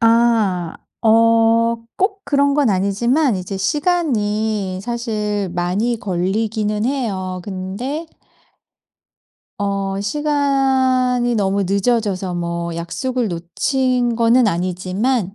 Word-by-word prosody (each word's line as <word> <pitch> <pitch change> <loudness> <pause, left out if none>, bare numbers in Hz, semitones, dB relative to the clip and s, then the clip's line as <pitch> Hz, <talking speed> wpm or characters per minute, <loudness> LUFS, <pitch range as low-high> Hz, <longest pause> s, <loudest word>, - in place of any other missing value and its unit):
아 225 -7 +2 0.2
어 230 +1 +4 0.2
꼭 390 +1 0
그런 280 0 +2
건 285 -5 +3
아니지만 220 +7 +1
이제 185 +1 -5
시간이 215 - 0
사실 210 -4 -2
많이 195 +7 0
걸리기는 210 +3 -1
해요. 195 -9 -2
근데 205 - -4 1.5
어 195 -1 -1
시간이 260 -2 +1
너무 200 -2 +1
늦어져서 200 -2 0
뭐 170 -1 -3
약속을 245 +9 -2
놓친 240 +8 0
거는 235 +1 +4
아니지만 185 +4 -1
220 Hz, 190 characters per minute, -19 LUFS, 190-250 Hz, 1.5 s, 어